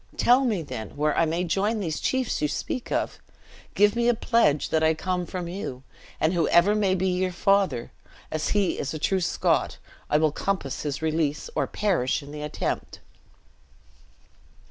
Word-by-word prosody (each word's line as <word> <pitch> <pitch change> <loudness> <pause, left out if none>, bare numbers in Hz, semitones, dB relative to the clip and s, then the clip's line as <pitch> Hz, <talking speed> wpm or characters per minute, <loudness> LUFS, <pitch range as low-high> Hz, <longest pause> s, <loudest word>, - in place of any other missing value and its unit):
Tell 250 +3 +5
me, 210 -9 0
then, 110 -4 -7
where 150 0 +1
I 165 - +3
may 165 +3 -1
join 200 +6 0
these 160 -6 -2
chiefs 260 -9 -1
you 150 - +2
speak 245 - -4
of. - - -1 0.6
Give 205 +2 +4
me 235 0 +1
a 240 - +4
pledge 220 - +2
that 160 - +1
I 160 0 +3
come 180 +1 -2
from 180 -2 -4
you; 170 -8 -6 0.4
and 160 +3 +2
whoever 170 +3 +4
may 200 -3 +2
be 190 +1 0
your 185 0 0
father, 195 -8 +1 0.4
as 155 0 -1
he 200 -3 +1
is 140 +3 -3
a - - -2
true 190 +5 0
Scot, 170 - +1 0.3
I 150 - +4
will 155 0 +3
compass 170 -5 -2
his 145 +1 -4
release, 155 - -1
or - - 0
perish 170 -10 0
in 140 - -11
the 150 0 -7
attempt." 150 0 -3
175 Hz, 175 wpm, -25 LUFS, 150-200 Hz, 0.6 s, Tell